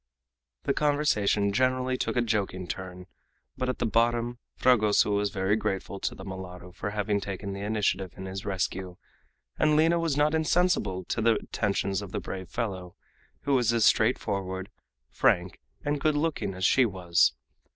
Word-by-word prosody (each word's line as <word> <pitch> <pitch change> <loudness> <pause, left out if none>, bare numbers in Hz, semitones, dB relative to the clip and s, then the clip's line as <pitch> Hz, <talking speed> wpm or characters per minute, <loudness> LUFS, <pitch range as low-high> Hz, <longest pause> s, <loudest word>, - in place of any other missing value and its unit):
The - - +1
conversation 105 -10 +2
generally 130 +2 +1
took - - -2
a 120 - +2
joking 100 -5 -1
turn, 90 -1 -6 0.5
but 130 0 -2
at 130 - -2
the - - -1
bottom 120 +1 +1 0.2
Fragoso 110 -4 +4
was 100 0 +1
very 95 +1 +1
grateful 100 -2 -3
to - - -2
the 95 - -10
mulatto 90 -2 -8
for 100 - -5
having 105 0 0
taken 100 0 -5
the 100 - -6
initiative 100 -3 0
in 95 - -7
his 95 +1 -5
rescue, 95 -2 -3 0.6
and 155 -1 +4
Lina 165 +2 +4
was 165 -4 0
not 150 +1 +3
insensible 160 - +1
to 115 - -2
the 115 0 +4
attentions 100 -2 -1
of 100 -3 -9
the - - -1
brave 95 -2 -6
fellow, 95 -6 -4 0.5
who 140 - 0
was 120 -4 +3
as 115 -2 +3
straightforward, 95 -1 +1 0.4
frank, - - +1 0.3
and 145 -1 -1
good 155 0 +2
looking 145 - -1
as 95 0 -1
she 130 - +5
was. 90 - +2
105 Hz, 165 wpm, -28 LUFS, 95-130 Hz, 0.6 s, she